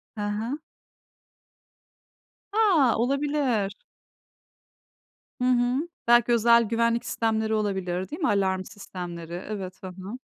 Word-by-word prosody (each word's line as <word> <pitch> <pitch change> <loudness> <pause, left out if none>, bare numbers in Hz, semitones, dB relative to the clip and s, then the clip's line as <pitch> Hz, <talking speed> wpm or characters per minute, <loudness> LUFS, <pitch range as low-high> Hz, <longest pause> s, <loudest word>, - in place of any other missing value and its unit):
Hı 210 - -5
hı. 220 +7 -2 2.0
A! 360 - +4
Olabilir. 260 -5 0 1.7
Hı - - +1
hı. 255 +5 +2 0.2
Belki 240 0 +5
özel 235 0 +5
güvenlik 230 +1 +1
sistemleri 220 -1 0
olabilir. 190 -3 -1
Değil 310 - -6
mi? 315 - +2
Alarm 190 -4 +1
sistemleri. 175 -5 -8 0.2
Evet, 190 -3 -5
ha - - -5
ha. 190 +5 -8
225 Hz, 105 wpm, -26 LUFS, 195-245 Hz, 2.0 s, Belki